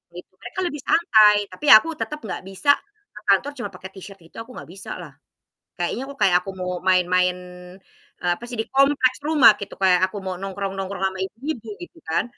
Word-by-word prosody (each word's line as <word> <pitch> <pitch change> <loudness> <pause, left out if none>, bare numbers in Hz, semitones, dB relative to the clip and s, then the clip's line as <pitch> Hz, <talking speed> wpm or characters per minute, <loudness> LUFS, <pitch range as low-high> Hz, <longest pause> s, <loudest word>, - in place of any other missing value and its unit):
Gitu, 180 - -11
mereka 240 +10 -7
lebih 295 -4 -6
santai 215 -11 +5
tapi, 240 +11 -8
aku 215 +10 +8
tetep 300 0 -5
gak 185 - -5
bisa 195 +10 +2 0.4
ke 210 - -11
kantor 265 +9 +2
cuma 240 -6 -5
pake 185 +1 -9
t-shirt 195 0 -11
itu - - -31
aku 240 +3 -12
gak - - -11
bisalah. 190 +3 -9 0.7
Kayaknya 175 +8 -2
kok 280 - -10
kayak 180 -2 +4
aku 195 - -9
mau 180 0 -3
main-main, 180 0 +2 0.8
eee, 175 -1 +1
apa - - -21
sih 240 - -6
di - - -6
kompleks 275 -2 +3
rumah 295 -8 +7
gitu, 200 - -7
kayak 180 -2 +4
aku 205 - -8
mau 185 - -3
nongkrong-nongkrong 195 0 -4
sama 190 0 -3
ibu-ibu 230 +1 -6
gitu 350 -1 -11
kan, 160 - +1
200 Hz, 190 wpm, -22 LUFS, 185-255 Hz, 0.8 s, aku